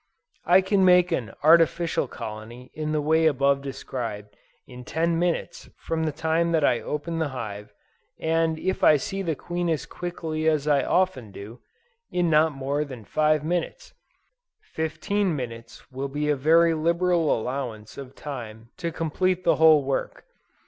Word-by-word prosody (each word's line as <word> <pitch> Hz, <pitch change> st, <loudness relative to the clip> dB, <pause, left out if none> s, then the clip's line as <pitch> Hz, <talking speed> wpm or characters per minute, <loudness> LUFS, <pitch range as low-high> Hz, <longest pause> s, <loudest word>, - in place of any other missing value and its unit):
I 180 Hz, +2 st, +6 dB
can 190 Hz, +1 st, +2 dB
make 180 Hz, -1 st, +5 dB
an 115 Hz, -3 st, -2 dB
artificial 165 Hz, -1 st, +4 dB
colony 115 Hz, +3 st, -9 dB
in 155 Hz, 0 st, -3 dB
the 155 Hz, -1 st, 0 dB
way 160 Hz, +2 st, +3 dB
above 140 Hz, -1 st, +2 dB
described 115 Hz, -7 st, -6 dB, 0.3 s
in 125 Hz, -1 st, -11 dB
ten 165 Hz, +5 st, 0 dB
minutes 175 Hz, -1 st, -2 dB
from 160 Hz, 0 st, -2 dB
the 155 Hz, -, 0 dB
time 160 Hz, +2 st, 0 dB
that 155 Hz, -3 st, +3 dB
I 120 Hz, -, +2 dB
open 165 Hz, +3 st, -4 dB
the 160 Hz, -, 0 dB
hive, 105 Hz, -6 st, -7 dB, 0.5 s
and 160 Hz, 0 st, +1 dB
if 190 Hz, +4 st, -2 dB
I 150 Hz, -, +7 dB
see 195 Hz, +8 st, -4 dB
the 165 Hz, -5 st, -1 dB
queen 175 Hz, +4 st, -3 dB
as 160 Hz, -2 st, -1 dB
quickly 160 Hz, -3 st, -4 dB
as 155 Hz, -2 st, 0 dB
I 140 Hz, -3 st, +3 dB
often 145 Hz, -, 0 dB
do, 105 Hz, +5 st, -10 dB, 0.5 s
in 175 Hz, -2 st, 0 dB
not 155 Hz, +1 st, +4 dB
more 140 Hz, +1 st, -2 dB
than 130 Hz, -7 st, -10 dB
five 155 Hz, +2 st, +1 dB
minutes. 175 Hz, -, -3 dB, 0.7 s
Fifteen 180 Hz, -, -2 dB
minutes 115 Hz, -1 st, -8 dB
will 135 Hz, +2 st, -4 dB
be 150 Hz, +2 st, -2 dB
a 150 Hz, -, +3 dB
very 165 Hz, +4 st, +4 dB
liberal 170 Hz, 0 st, +1 dB
allowance 115 Hz, -4 st, -5 dB
of 135 Hz, -1 st, -10 dB
time 115 Hz, -5 st, -8 dB
to 170 Hz, -2 st, -3 dB
complete 180 Hz, +3 st, -1 dB
the -, -, +3 dB
whole 155 Hz, -2 st, +6 dB
work. 135 Hz, 0 st, -3 dB
155 Hz, 160 wpm, -25 LUFS, 130-170 Hz, 0.7 s, I